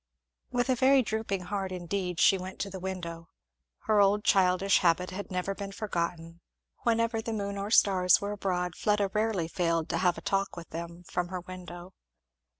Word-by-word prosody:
With 245 Hz, +1 st, 0 dB
a -, -, +5 dB
very 265 Hz, +1 st, +5 dB
drooping 215 Hz, -3 st, -2 dB
heart 195 Hz, 0 st, -3 dB
indeed 180 Hz, 0 st, -3 dB
she -, -, +6 dB
went 185 Hz, 0 st, -6 dB
to 200 Hz, -, -3 dB
the 190 Hz, -, -6 dB
window. 170 Hz, -3 st, -6 dB, 0.5 s
Her 210 Hz, -1 st, +3 dB
old 205 Hz, +1 st, +3 dB
childish 190 Hz, -1 st, +4 dB
habit 180 Hz, 0 st, +2 dB
had 200 Hz, +2 st, -6 dB
never 185 Hz, +1 st, -2 dB
been 200 Hz, 0 st, -6 dB
forgotten; 170 Hz, -5 st, -4 dB, 0.4 s
whenever 230 Hz, -1 st, +1 dB
the 225 Hz, -, -4 dB
moon 200 Hz, -2 st, -3 dB
or 200 Hz, 0 st, -3 dB
the -, -, 0 dB
stars 185 Hz, -3 st, +5 dB
were 200 Hz, 0 st, -3 dB
abroad 180 Hz, -4 st, -2 dB
Fleda 205 Hz, -2 st, +1 dB
rarely 215 Hz, -6 st, 0 dB
failed 165 Hz, -2 st, 0 dB
to -, -, 0 dB
have 180 Hz, -1 st, +2 dB
a -, -, -7 dB
talk 195 Hz, -2 st, -1 dB
with 170 Hz, -2 st, -9 dB
them 170 Hz, +1 st, -7 dB
from 180 Hz, 0 st, -2 dB
her 180 Hz, 0 st, -5 dB
window. 180 Hz, 0 st, -10 dB
190 Hz, 185 wpm, -29 LUFS, 175-205 Hz, 0.5 s, she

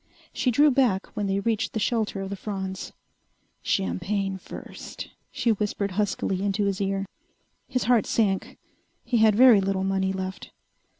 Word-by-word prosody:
She 255 Hz, -, +1 dB
drew 290 Hz, +5 st, +5 dB
back 245 Hz, -8 st, +1 dB
when 205 Hz, -1 st, -1 dB
they 195 Hz, 0 st, +1 dB
reached 220 Hz, +1 st, -1 dB
the 220 Hz, -, -1 dB
shelter 210 Hz, -2 st, 0 dB
of 195 Hz, 0 st, -5 dB
the -, -, -2 dB
fronds. 190 Hz, -2 st, -5 dB, 0.7 s
"Champagne, 190 Hz, -, -1 dB
first," -, -, -9 dB, 0.2 s
she 235 Hz, -, +1 dB
whispered 205 Hz, -1 st, -1 dB
huskily 190 Hz, -1 st, -1 dB
into 200 Hz, +1 st, 0 dB
his 200 Hz, 0 st, -1 dB
ear. 195 Hz, 0 st, -1 dB, 0.6 s
His 255 Hz, -1 st, -1 dB
heart 240 Hz, -2 st, +3 dB
sank. 200 Hz, -4 st, 0 dB, 0.5 s
He 240 Hz, 0 st, 0 dB
had 220 Hz, -2 st, +5 dB
very 240 Hz, -3 st, +7 dB
little 190 Hz, 0 st, 0 dB
money 190 Hz, 0 st, 0 dB
left. 190 Hz, 0 st, -5 dB
200 Hz, 155 wpm, -26 LUFS, 190-220 Hz, 0.7 s, very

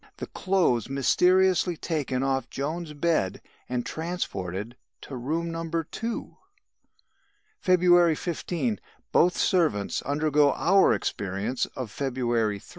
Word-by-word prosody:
The -, -, -5 dB
clothes 180 Hz, -, +1 dB
mysteriously 180 Hz, +5 st, +3 dB
taken 140 Hz, -6 st, -2 dB
off 135 Hz, -1 st, -1 dB
Joan's 155 Hz, +3 st, -4 dB
bed 150 Hz, -, 0 dB, 0.3 s
and 125 Hz, -1 st, -2 dB
transported 115 Hz, -, -4 dB, 0.3 s
to 135 Hz, -, -8 dB
room 160 Hz, +7 st, -2 dB
No. 165 Hz, 0 st, -4 dB
2. 170 Hz, +8 st, -4 dB, 1.2 s
"February 175 Hz, -2 st, +5 dB
15. 150 Hz, -, -2 dB, 0.3 s
Both 180 Hz, -, +4 dB
servants 155 Hz, -, +1 dB
undergo 145 Hz, 0 st, +2 dB
our 195 Hz, +3 st, +4 dB
experience 105 Hz, +6 st, -2 dB
of 125 Hz, -6 st, -5 dB
February 120 Hz, -5 st, 0 dB
3. -, -, -17 dB
150 Hz, 110 wpm, -26 LUFS, 125-170 Hz, 1.2 s, February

